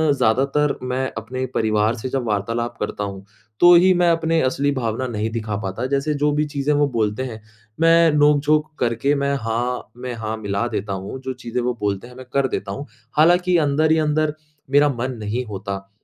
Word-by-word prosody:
ज़्यादातर 140 +5 +2
मैं 130 +1 -1
अपने 130 +4 -4
परिवार 110 +1 +1
से 125 +2 -5
जब 130 -1 -1
वार्तालाप 115 +3 -2
करता 105 - -3
हूँ, 100 -1 -6 0.3
तो 175 0 +8
ही 185 +2 +6
मैं 175 -1 +3
अपने 165 0 +1
असली 140 +2 +1
भावना 130 -2 -2
नहीं 110 -2 -2
दिखा 110 -2 -3
पाता 95 +6 -3
जैसे 140 +2 0
जो 150 - +3
भी 150 +1 +1
चीज़ें 145 +1 +1
वो 145 0 +3
बोलते 110 0 -1
हैं 110 -4 -7 0.4
मैं 165 -1 +6
नोकझोंक 150 +1 +3
करके 120 +4 +1
मैं 140 0 0
हाँ 120 +1 -2
में 125 0 -5
हाँ 110 -1 -4
मिला 100 +2 -2
देता 100 -3 -3
हूँ 95 +7 -6
जो 130 0 -4
चीज़ें 125 -1 -4
वो 125 0 0
बोलते 100 +2 -2
हैं 125 - -14
मैं 130 0 -10
कर 140 -1 +2
देता 100 -5 -4
हूँ। 140 +8 -6 0.3
हालाँकि 175 +3 +4
अंदर 155 0 +2
ही 160 - +4
अंदर, 155 0 +1 0.4
मेरा 145 +1 +5
मन 130 +2 -2
नहीं 110 +4 -3
होता 100 -2 -6
130 Hz, 195 wpm, -21 LUFS, 110-145 Hz, 0.4 s, तो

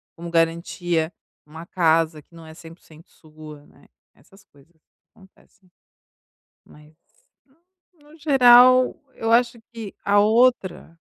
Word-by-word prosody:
como 170 +1 -10
garantia 165 0 -2 0.3
uma 160 +3 -13
casa 165 -3 -1
que 170 - -34
não 165 -1 -14
é 160 - -13
100% 165 -1 -17
sua, 155 -2 -16
né, - - -24 0.3
essas 195 +1 -24
coisas 145 +4 -27 0.4
acontecem. 190 0 -26 0.9
Mas, 150 +1 -21 0.5
no 335 0 -30
no - - -18
geral, 255 -3 +4 0.2
eu 225 0 -4
acho 235 0 +1
que 220 -4 -9
a 205 0 +2
outra 215 -6 0
175 Hz, 120 wpm, -21 LUFS, 160-240 Hz, 0.9 s, geral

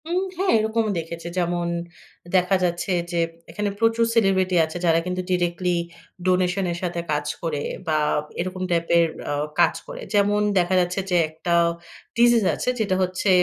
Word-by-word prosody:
উম 360 +2 +1 0.2
হ্যাঁ, 380 +1 +1
এরকমও 220 0 0
দেখেছি। 165 +1 -7
যেমন 175 -1 0 0.7
দেখা 185 +1 +3
যাচ্ছে 175 +2 -1 0.2
যে, 170 - 0 0.3
এখানে 210 -1 -2
প্রচুর 225 +1 +3
সেলিব্রিটি 190 -4 +3
আছে, 160 +2 -7
যারা 165 -1 +4
কিন্তু 180 0 -2
ডিরেক্টলি 175 0 0 0.5
ডোনেশনের 180 -1 +1
সাথে 175 -1 -2
কাজ 150 0 0 0.2
করে, 155 -4 -2 0.3
বা 155 -1 +2 0.4
এরকম 185 +1 -3
টাইপের 170 0 +3 0.3
আ - - 0 0.3
কাজ - - +4
করে। - - -8
যেমন 205 0 +3 0.2
দেখা 175 +1 +1
যাচ্ছে 180 +2 -1
যে, 180 - +4
একটা 160 +2 -3 0.6
ডিজিজ 240 -1 +5
আছে, - - -2
যেটা 200 -4 +1
হচ্ছে 185 +2 -1
180 Hz, 150 wpm, -23 LUFS, 170-205 Hz, 0.7 s, ডিজিজ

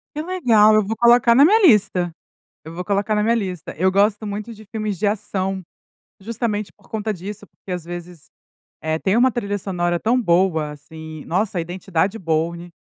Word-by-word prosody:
Que 305 - -2
legal! 240 - +4
Eu 215 - +4
vou 220 +3 -2
colocar 235 0 +5
na 275 +4 +7
minha 425 +7 +5
lista, 190 - +3 0.5
eu 160 +1 -9
vou 180 +2 -5
colocar 205 +2 0
na 210 - +1
minha 230 +2 +2
lista. 185 -8 -4
Eu 185 +4 +2
gosto 205 +2 +1
muito 210 +3 -5
de 215 0 -14
filmes 215 -2 -4
de 205 - 0
ação, 195 -2 -2 0.6
justamente 215 -1 -3
por 205 - -25
conta 215 0 -2
disso, 205 +3 -8
porque 190 - -13
às 180 -2 -3
vezes, 175 -2 -9 0.5
eh, 160 0 -1
tem 195 +5 +1
uma 255 +2 +4
trilha 205 -4 -2
sonora 175 -3 -1
tão 245 +6 +1
boa, 170 -5 +1
assim, 155 +1 -10
nossa, 190 +3 -1
a - - +1
Identidade 185 +3 -2
Bourne, 170 +1 -2
200 Hz, 185 wpm, -21 LUFS, 175-215 Hz, 0.6 s, na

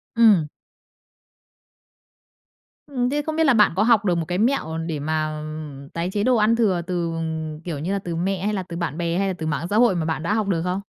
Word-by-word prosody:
Ừm. 210 -9 +5 2.4
Ừm, 255 -4 -1
thế 295 +1 0
không 315 +1 -4
biết 320 - +3
là 275 - +5
bạn 210 -2 +5
có 200 - +3
học 220 -3 +4
được 175 -2 +2
một 165 - -1
cái 180 0 -1
mẹo 215 - 0
để 155 -3 -3
mà, 155 +1 -1
ừm, 150 -2 -8
tái 170 +2 -3
chế 205 0 0
đồ 255 0 +3
ăn 220 +1 +3
thừa 195 -7 +2
từ, 175 -2 -1
ừm, 160 -1 -4
kiểu 165 -4 -5
như 175 +6 -3
là, 200 - 0
từ 175 -3 -5
mẹ 190 +2 -1
hay 210 - 0
là 190 -2 -2
từ 170 -1 -7
bạn 170 -3 -3
bè, 170 0 -1
hay 195 0 +1
là 190 - -1
từ 160 - -4
mạng 160 +2 -2
xã 210 - 0
hội 235 -6 +5
mà 165 -2 -1
bạn 160 -1 -2
đã 190 - 0
học 215 -2 0
được 175 -4 0
không? 180 +2 -1
180 Hz, 245 wpm, -23 LUFS, 160-210 Hz, 2.4 s, Ừm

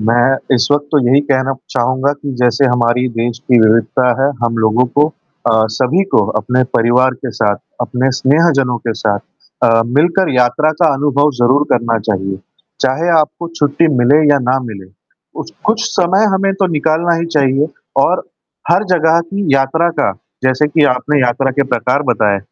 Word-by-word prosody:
मैं 120 +4 +2 0.2
इस 125 0 +1
वक़्त 145 0 0
तो 150 - +4
यही 135 +3 +4
कहना 135 -1 -1 0.2
चाहूँगा 130 +3 0
कि 145 -1 -7
जैसे 120 +3 +2
हमारी 125 0 +1
देश 115 +1 -2
की 125 -2 +2
विविधता 115 +3 +2
है 140 - +2
हम 115 -1 -1
लोगों 115 +4 +2
को 145 +1 +4 0.4
अ, 110 0 +3
सभी 135 - +1
को 105 - +3
अपने 125 +4 0
परिवार 125 +3 +2
के 130 +1 -7
साथ, 105 -2 +1 0.2
अपने 125 +2 -1
स्नेहजनों 135 -4 +2
के 115 -1 -3
साथ 105 -2 0 0.5
अ, 115 0 +3
मिलकर 170 +7 +1
यात्रा 125 +5 +2
का 160 -3 +4
अनुभव 145 +1 +1
ज़रूर 130 +5 +3
करना 115 -1 0
चाहिए। 95 -2 -2 0.4
चाहे 135 +6 0
आपको 165 +2 -2
छुट्टी 145 +3 +1
मिले 125 +5 +4
या 140 - +2
ना 130 +1 +2
मिले 100 -5 -10 0.5
उच - - -8
कुछ 225 +2 0
समय 190 +2 +1
हमें 195 0 0
तो - - +3
निकालना 160 +3 0
ही 170 - -2
चाहिए 140 -3 +1 0.4
और - - 0 0.5
हर 185 +5 +3
जगह 165 -1 +3
की 200 0 -3
यात्रा 140 +5 +1
का, - - +1 0.3
जैसे 130 +3 +1
कि 150 0 +2
आपने 140 +3 -1
यात्रा 125 +2 0
के - - +5
प्रकार 125 +4 0
बताए, 105 -4 +1
130 Hz, 170 wpm, -14 LUFS, 120-150 Hz, 0.5 s, के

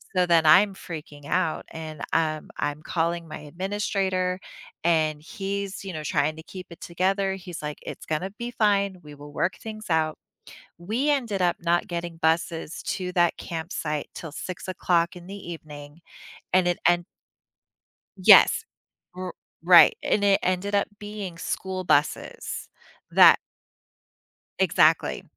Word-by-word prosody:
So, 180 -1 +4
then 165 -2 +4
I'm 195 +5 +6
freaking 150 -5 -9
out, 180 -4 0
and, 155 -2 -8
um, 155 -2 0
I'm 145 +1 -2
calling 170 0 -1
my - - -7
administrator, 185 +2 -2 0.4
and 155 -3 +2
he's, 200 +1 -5
you 190 - -5
know, 155 - -4
trying 150 +1 0
to - - -8
keep 185 0 -9
it 170 - -12
together. 190 +2 0
He's 180 -3 -8
like, 150 0 -5
"It's - - -8
gonna 170 +5 -2
be 240 0 -3
fine. 200 -4 +1
We 150 -1 -11
will 145 +1 -12
work 180 - 0
things 215 -1 -8
out." 160 -1 +1 0.6
We 225 +12 -1
ended 235 -9 0
up 175 -1 +2
not 170 +1 +1
getting 170 -1 -4
buses 160 0 -1
to 190 -3 -3
that 175 -1 +2
campsite 160 -3 -4
till 165 -4 -8
6:00 180 -1 -1
in 175 0 -11
the 195 - -8 0.2
evening, 150 0 -11 0.5
and 185 -1 +4
it 175 - -1
and 175 0 +3 1.1
Yes. - - +7 0.5
R 185 -1 -5 0.3
right. 175 -1 +8
And 205 - +1
it 200 -1 +4
ended 185 +3 0
up 200 - +2
being 205 -4 -6
school 185 +2 -3
buses 150 -3 0 0.4
that - - +8 1.2
Exactly. - - +3
175 Hz, 140 wpm, -25 LUFS, 160-195 Hz, 1.2 s, right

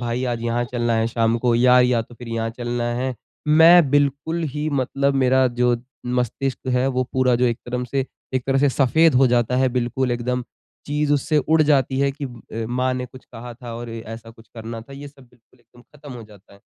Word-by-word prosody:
भाई 120 +1 -2
आज 120 -2 -2
यहाँ 120 +1 -1
चलना 120 -1 0
है 115 0 +1
शाम 115 0 +1
को 120 0 +1
या 125 +1 +5
या 125 -1 +3
तो 120 - -16
फिर 120 0 -11
यहाँ 115 0 -2
चलना 120 0 -3
है। 130 +1 -2 0.3
मैं 160 -1 +7
बिल्कुल 145 +4 0
ही 150 +1 -2
मतलब 140 +2 0
मेरा 130 0 +3
जो 125 -1 +3 0.3
मस्तिष्क 125 +2 -2
है 125 +1 +2
वो 130 -1 0
पूरा 130 -1 +2
जो 125 - +1
एक 120 -1 0
तरफ 125 0 -3
से 135 -1 0 0.3
एक 125 - -1
तरह 135 0 +2
से 145 +1 +3
सफेद 140 +4 +3
हो 130 +1 +5
जाता 120 0 +1
है 130 0 +3
बिल्कुल 125 +1 -1
एकदम। 125 +1 -2 0.4
चीज़ 150 0 0
उससे 150 +2 +1
उड़ 155 +3 +2
जाती 135 -3 +2
है 140 0 +2
कि 145 +1 -7
अ, 115 -3 -7
माँ 125 +1 0
ने 125 0 -4
कुछ 130 +2 -15
कहा 120 0 -10
था 120 -1 -9
और 120 0 -7
ऐसा 115 0 -8
कुछ 115 -1 -19
करना 115 0 -7
था। 120 +5 -14
ये 140 +1 -9
सब 140 -1 -19
बिल्कुल 120 +1 -29
एकदम 120 +1 -21
ख़त्म 145 0 -13
हो 120 - -9
जाता 105 -2 -18
है। 100 - -21
125 Hz, 220 wpm, -21 LUFS, 120-135 Hz, 0.4 s, मैं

